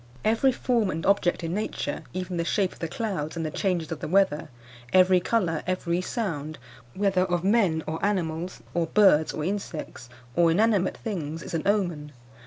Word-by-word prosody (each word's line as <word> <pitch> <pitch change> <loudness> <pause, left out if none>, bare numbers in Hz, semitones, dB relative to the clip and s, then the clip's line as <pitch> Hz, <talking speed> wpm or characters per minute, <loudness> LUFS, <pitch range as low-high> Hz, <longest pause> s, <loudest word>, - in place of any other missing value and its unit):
Every 225 +5 +4
form 240 -4 0
and 165 -2 -3
object 190 -3 +2
in 165 +1 -2
nature, 210 +3 -3
even 185 -1 -4
the 170 - 0
shape 190 +2 0
of - - -18
the 165 - -2
clouds 170 -5 -3
and 165 - -2
the 155 - -3
changes 180 -4 -1
of 160 - -4
the - - -4
weather; 185 -3 +2 0.4
every 185 0 +6
colour, 180 -4 0
every 180 -1 0
sound, 160 - -3 0.4
whether 195 -2 +2
of 175 -2 0
men 190 -6 +2
or 160 +1 -4
animals, 180 -3 -2
or 170 -1 0
birds 175 -6 +4
or 155 - -4
insects, 170 -9 -5 0.3
or 170 -1 +4
inanimate 200 +1 +2
things, 165 -7 -4
is 190 - -8
an 165 - 0
omen. 175 -8 0
180 Hz, 180 wpm, -26 LUFS, 165-200 Hz, 0.4 s, every